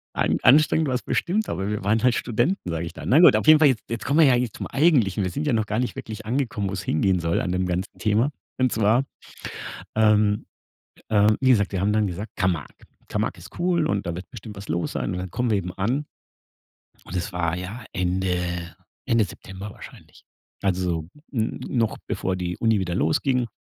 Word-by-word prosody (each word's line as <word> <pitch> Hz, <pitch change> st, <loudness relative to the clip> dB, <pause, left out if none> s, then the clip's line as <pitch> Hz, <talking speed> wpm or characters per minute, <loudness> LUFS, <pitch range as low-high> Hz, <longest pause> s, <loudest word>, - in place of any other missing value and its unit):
An -, -, +1 dB
anstrengend 155 Hz, +2 st, +5 dB
war's 125 Hz, -1 st, -1 dB
bestimmt, 205 Hz, +5 st, -1 dB
aber 95 Hz, +1 st, -2 dB
„wir 105 Hz, -2 st, -3 dB
waren 110 Hz, +3 st, +2 dB
halt 125 Hz, -1 st, +4 dB
Studenten“, 120 Hz, -, -1 dB
sage 85 Hz, 0 st, -2 dB
ich 85 Hz, -, -7 dB
da -, -, -9 dB
Na 135 Hz, -, +5 dB
gut, 175 Hz, -, +8 dB
auf -, -, 0 dB
jeden 155 Hz, 0 st, +9 dB
Fall 150 Hz, -2 st, +6 dB
je 130 Hz, -, +3 dB
jetzt 115 Hz, -1 st, -4 dB
kommen 145 Hz, +4 st, +2 dB
wir 155 Hz, -, +7 dB
ja 130 Hz, -, +5 dB
jetzt 120 Hz, -3 st, -2 dB
zum -, -, -5 dB
Eigentlichen. 125 Hz, -, +3 dB
Wir 90 Hz, -, -2 dB
sind 145 Hz, +2 st, -3 dB
ja 145 Hz, -, +2 dB
noch 110 Hz, -2 st, +1 dB
gar 110 Hz, +2 st, -2 dB
nicht 125 Hz, -, -2 dB
wirklich 110 Hz, -1 st, -7 dB
angekommen, 115 Hz, -5 st, -1 dB
wo's 95 Hz, +1 st, -4 dB
hingehen 95 Hz, +2 st, +1 dB
soll 85 Hz, 0 st, 0 dB
an 90 Hz, -, -2 dB
dem 90 Hz, 0 st, 0 dB
ganzen 90 Hz, +1 st, -3 dB
Thema. 110 Hz, +6 st, +2 dB, 0.3 s
Und 130 Hz, -1 st, +3 dB
zwar, 110 Hz, +5 st, +2 dB, 0.9 s
ähm, 105 Hz, -1 st, +3 dB, 0.7 s
äh, 105 Hz, -1 st, +4 dB
wie 130 Hz, -1 st, +3 dB
gesagt, 105 Hz, -5 st, +3 dB
wir 95 Hz, -, -1 dB
haben 105 Hz, +2 st, +2 dB
dann 105 Hz, -1 st, +2 dB
gesagt: 100 Hz, +4 st, -5 dB
„Camargue. 90 Hz, -6 st, -2 dB, 0.2 s
Camargue -, -, -2 dB
ist -, -, -12 dB
cool, 170 Hz, -2 st, +1 dB
und 100 Hz, -, -1 dB
da 85 Hz, -, -2 dB
wird 90 Hz, +2 st, -8 dB
bestimmt 110 Hz, -4 st, -9 dB
was 100 Hz, -, -9 dB
los 85 Hz, +2 st, -1 dB
sein“, -, -, -2 dB
und 90 Hz, -, -3 dB
dann 90 Hz, -1 st, -5 dB
kommen 125 Hz, -1 st, -1 dB
wir 105 Hz, -, +3 dB
eben 90 Hz, -1 st, -4 dB
an, 125 Hz, +10 st, -1 dB, 1.0 s
und 95 Hz, -, -9 dB
es 90 Hz, +2 st, -4 dB
war 90 Hz, -1 st, -1 dB
ja 100 Hz, +7 st, -6 dB
Ende 90 Hz, -1 st, -1 dB, 0.3 s
Ende 115 Hz, -4 st, +3 dB
September 95 Hz, +3 st, -9 dB
wahrscheinlich. -, -, -14 dB, 0.4 s
Also, 90 Hz, -4 st, 0 dB, 0.3 s
n 110 Hz, -3 st, -1 dB
noch 115 Hz, -4 st, 0 dB
bevor 95 Hz, -1 st, -2 dB
die 90 Hz, -1 st, -3 dB
Uni 110 Hz, -3 st, +3 dB
wieder 90 Hz, -2 st, -2 dB
losging, 120 Hz, -, +1 dB
105 Hz, 210 wpm, -24 LUFS, 90-125 Hz, 1.0 s, jeden